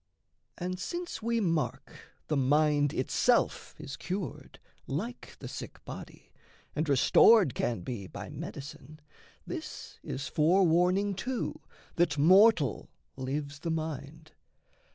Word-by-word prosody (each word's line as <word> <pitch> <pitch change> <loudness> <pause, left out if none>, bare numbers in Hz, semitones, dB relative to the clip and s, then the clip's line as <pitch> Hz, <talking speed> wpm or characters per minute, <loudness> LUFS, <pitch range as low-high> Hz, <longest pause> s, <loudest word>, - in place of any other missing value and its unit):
And, 180 0 -4
since 345 - -4
we 230 +1 0
mark 165 -7 -1 0.3
the 155 - 0
mind 145 +1 +3
itself 130 -4 +1
is 140 - -7
cured, 180 - -5 0.3
Like 210 - -5
the - - -8
sick - - -8
body, - - -10 0.4
and 155 0 -1
restored 150 - +6
can 115 -6 -1
be 100 -1 -5
By 100 +1 -8
medicine, 155 -2 -8 0.5
this - - -7
is 135 0 -5
forewarning 180 +5 +3
too 245 +6 -3 0.4
That 165 -4 +2
mortal 180 - +5 0.3
lives 140 +2 -4
the 170 - -4
mind. 155 -1 -5
155 Hz, 110 wpm, -30 LUFS, 140-185 Hz, 0.5 s, restored